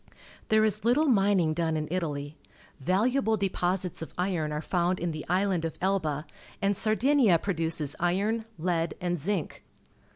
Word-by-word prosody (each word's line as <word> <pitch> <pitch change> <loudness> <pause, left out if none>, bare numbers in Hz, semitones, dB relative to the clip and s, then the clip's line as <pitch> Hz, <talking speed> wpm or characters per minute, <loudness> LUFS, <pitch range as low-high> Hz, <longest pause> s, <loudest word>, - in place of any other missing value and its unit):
There 220 0 +4
is 210 -1 -1
little 250 +7 +3
mining 195 - +3
done 160 -1 0
in 155 0 -3
Italy. 150 -5 -3 0.4
Valuable 220 - +1
deposits 185 -2 -1
of 160 - -8
iron 175 -4 -1
are 150 - -2
found 175 +2 0
in 175 0 -1
the 155 -1 -5
island 185 -2 +1
of 165 - -4
Elba, 165 -6 0 0.3
and 200 0 +1
Sardinia 220 -1 +3
produces 160 -5 -1
iron, 205 +6 0
lead, 165 0 -1
and 175 -1 -1
zinc. 185 +1 -3
180 Hz, 150 wpm, -28 LUFS, 160-205 Hz, 0.4 s, There